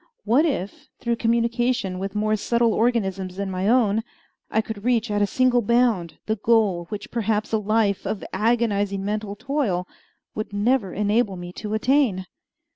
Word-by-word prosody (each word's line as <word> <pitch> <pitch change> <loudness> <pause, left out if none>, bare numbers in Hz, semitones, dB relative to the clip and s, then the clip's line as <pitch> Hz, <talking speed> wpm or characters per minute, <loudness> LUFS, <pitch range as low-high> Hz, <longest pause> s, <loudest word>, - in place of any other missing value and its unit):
What 285 +8 +3
if, 205 - -4
through 235 -1 -1
communication 235 -3 0
with 195 +1 -4
more 215 +1 +1
subtle 230 +2 +1
organisms 195 -6 0
than 195 0 -3
my 185 +2 0
own, 225 -3 +3 0.5
I 220 - +1
could 220 -2 -4
reach 235 -2 +1
at 205 0 +1
a 205 - +3
single 250 +2 +3
bound 230 -7 +1
the 220 0 -1
goal 205 -6 +2
which 210 -1 -6
perhaps 220 -2 -1
a 220 - +3
life, 210 -1 +1
of 210 - -3
agonizing 205 -2 +1
mental 210 0 -3
toil 210 -9 -1 0.5
would 215 -1 -5
never 205 -1 +1
enable 210 0 +1
me 175 0 -8
to 210 +2 -4
attain? 235 -6 +2
215 Hz, 160 wpm, -23 LUFS, 200-235 Hz, 0.5 s, What